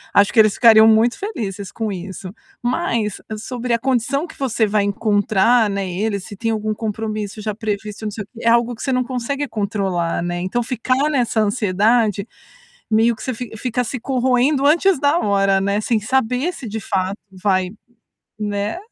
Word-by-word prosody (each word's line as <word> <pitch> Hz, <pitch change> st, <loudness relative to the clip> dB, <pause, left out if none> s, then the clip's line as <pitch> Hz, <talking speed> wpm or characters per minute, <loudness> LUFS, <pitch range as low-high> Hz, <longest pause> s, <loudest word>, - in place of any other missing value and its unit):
Acho 200 Hz, -1 st, +5 dB
que 230 Hz, -, +4 dB
eles 215 Hz, -2 st, +6 dB
ficariam 220 Hz, -2 st, +7 dB
muito 225 Hz, +2 st, +4 dB
felizes 205 Hz, -, -5 dB
com 220 Hz, -2 st, -3 dB
isso. 185 Hz, 0 st, -7 dB, 0.3 s
Mas, 240 Hz, -, -1 dB, 0.2 s
sobre 245 Hz, +2 st, -4 dB
a 235 Hz, -, +2 dB
condição 265 Hz, +4 st, 0 dB
que -, -, -14 dB
você 245 Hz, -4 st, +1 dB
vai 205 Hz, 0 st, +1 dB
encontrar, 210 Hz, +2 st, +2 dB
né, 200 Hz, -1 st, -2 dB
ele, 200 Hz, +3 st, -1 dB
se 205 Hz, +2 st, -9 dB
tem 225 Hz, +3 st, -2 dB
algum 215 Hz, -1 st, -1 dB
compromisso 215 Hz, -1 st, -4 dB
já 215 Hz, 0 st, -2 dB
previsto, 210 Hz, -1 st, -4 dB
não 210 Hz, -, -2 dB
sei 210 Hz, +1 st, -5 dB
o -, -, -19 dB
quê, 230 Hz, -, -12 dB
é -, -, +5 dB
algo 235 Hz, +1 st, +3 dB
que 225 Hz, -, -12 dB
você 270 Hz, -, -1 dB
não 255 Hz, -1 st, +1 dB
consegue 265 Hz, +3 st, -3 dB
controlar, 195 Hz, -7 st, -1 dB
né, 175 Hz, 0 st, -2 dB
então 185 Hz, +7 st, -1 dB
ficar 255 Hz, +4 st, 0 dB
nessa 245 Hz, -6 st, +1 dB
ansiedade, 210 Hz, 0 st, +2 dB, 0.6 s
meio 225 Hz, +2 st, +3 dB
que -, -, -11 dB
você 260 Hz, -, -2 dB
fi 245 Hz, -1 st, -6 dB
fica 250 Hz, +2 st, -1 dB
se 250 Hz, +3 st, -4 dB
corroendo 260 Hz, +2 st, +2 dB
antes 345 Hz, +4 st, +4 dB
da 290 Hz, +3 st, +3 dB
hora, 195 Hz, -, +2 dB
né, 200 Hz, +2 st, 0 dB
sem 225 Hz, +1 st, +1 dB
saber 255 Hz, -, 0 dB
se 255 Hz, -8 st, -8 dB
de 220 Hz, +2 st, -4 dB
fato 190 Hz, -1 st, -2 dB
vai, 185 Hz, -1 st, 0 dB, 0.7 s
né, 205 Hz, +3 st, -2 dB
220 Hz, 185 wpm, -20 LUFS, 200-245 Hz, 0.7 s, ficariam